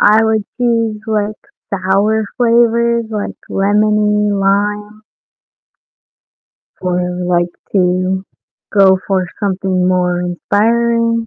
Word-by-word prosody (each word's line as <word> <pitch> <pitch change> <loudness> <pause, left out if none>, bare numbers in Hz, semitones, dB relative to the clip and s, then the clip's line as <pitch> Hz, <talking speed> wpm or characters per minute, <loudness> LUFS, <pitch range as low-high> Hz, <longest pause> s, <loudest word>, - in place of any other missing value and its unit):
I 215 +2 +5
would 220 -2 +1
choose, 230 -3 0
like, 215 -1 -1 0.3
sour 200 +3 +1
flavors 235 -1 +2
like 210 -1 -4
lemony, 210 +1 +2
lime 205 +2 -1 1.8
or 180 -1 0
I - - -1
would 180 0 -4
like 175 -1 +1 0.2
to 185 0 +1 0.5
go 190 -1 +6
for 190 -2 0
something 190 -2 0
more 180 -1 +1
inspiring, 230 +5 0
205 Hz, 100 wpm, -15 LUFS, 185-220 Hz, 1.8 s, go